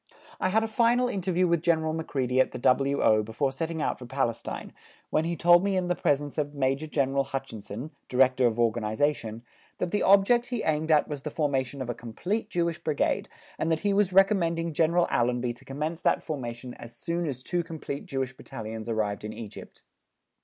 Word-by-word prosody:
I 185 - +1
had 220 +3 +3
a - - -1
final 235 +2 +3
interview 185 -5 +1
with 170 -2 +2
General 160 -2 +1
Macready 130 -5 -1
at 130 - +3
the - - -4
W.O. 130 -3 +3
before 115 +6 -1
setting 160 +3 -3
out - - -1
for 125 - -9
Palestine, 120 -3 -3 0.4
when 155 - +2
he 170 +1 -1
told 175 +1 +6
me 200 -1 +1
in 180 -1 -1
the 180 - +2
presence 145 -1 0
of 145 0 -2
Major 135 +2 0
General 140 -2 +1
Hutchison, 130 -1 -6 0.2
Director 130 0 +4
of 115 -1 -1
Organization, 115 +1 0 0.3
that 180 - -2
the 205 - +1
object 200 +5 +5
he 245 -3 -3
aimed 155 +1 0
at 155 -2 +4
was 145 -2 -5
the 150 - -4
formation 140 -3 -1
of 125 - -8
a - - -3
complete 175 - -3
Jewish 170 -1 -1
Brigade, 155 -3 0 0.3
and 165 - 0
that 160 - +1
he 205 -1 +1
was 200 -1 +3
recommending 170 -4 +3
General 170 +3 +3
Allenby 120 0 +1
to 120 - -17
commence 155 +5 -3
that - - +2
formation 125 -4 -5
as 115 0 -10
soon 170 +5 -2
as 130 -3 -5
two 175 +4 0
complete 160 -4 -6
Jewish 135 -1 -3
Battalions 110 -3 -7
arrived 105 -2 -1
in 105 0 -5
Egypt. 110 -3 -10
145 Hz, 190 wpm, -27 LUFS, 125-170 Hz, 0.4 s, told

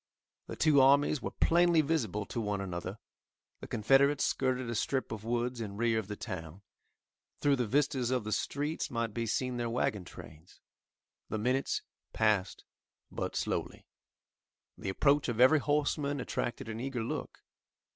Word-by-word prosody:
The - - -6
two 150 -3 +4
armies 140 +1 +4
were - - -3
plainly 170 -1 +4
visible 140 -9 -1
to 115 - -4
one 105 -2 -1
another. 95 +1 -5 0.6
The - - -9
Confederates 135 +6 +3
skirted 130 -1 0
a 120 - -2
strip 130 +4 -1
of 110 -2 -5
woods 120 +1 -1
in 100 -2 -5
rear 115 0 +2
of 105 - -6
the 105 - -5
town. 95 -3 -7 0.8
Through 145 -1 +3
the 125 -3 0
vistas 130 -1 +1
of 125 -3 0
the 110 - -5
streets 145 +7 -2
might 115 -2 -2
be 115 0 -2
seen 125 +2 -1
their 120 -1 -2
wagon 110 -4 -1
trains. 80 0 -13 0.7
The - - -2
minutes 125 +5 0 0.3
passed 105 -3 +1 0.5
but - - -4
slowly. - - -3 0.9
The 95 - -5
approach 140 +8 +2
of 120 -1 -3
every 130 +5 +7
horseman 145 0 0
attracted 120 -2 -3
an 110 0 -5
eager 125 -2 -3
look. - - -5
120 Hz, 155 wpm, -31 LUFS, 110-140 Hz, 0.9 s, every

